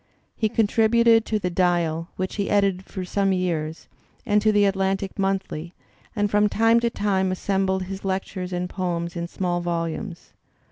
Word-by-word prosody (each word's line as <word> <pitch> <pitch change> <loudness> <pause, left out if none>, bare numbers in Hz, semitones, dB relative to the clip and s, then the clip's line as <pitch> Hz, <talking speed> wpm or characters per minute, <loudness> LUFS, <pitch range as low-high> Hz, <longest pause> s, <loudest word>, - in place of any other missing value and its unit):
He 220 - 0
contributed 225 +1 +4
to 215 - +1
the 180 -3 -2
Died, 170 -2 +1
which 185 +2 -4
he 200 - -1
edited 195 -2 +2
for 185 -2 -6
some 195 +1 +1
years, 165 -4 -2 0.4
and 210 -3 +3
to 215 0 +4
the 205 -1 +4
Atlantic 195 0 -1
Monthly 190 -4 -2
y - - -36 0.3
and 205 -2 0
from 210 0 +3
time 225 +2 +4
to 235 0 +1
time 195 -4 0
assembled 190 0 0
his 190 +1 -7
lectures 190 -1 -3
and 180 0 -2
poems 175 -2 -3
in 170 0 -3
small 175 -1 -2
volumes. 170 +2 -4
190 Hz, 170 wpm, -24 LUFS, 180-205 Hz, 0.4 s, contributed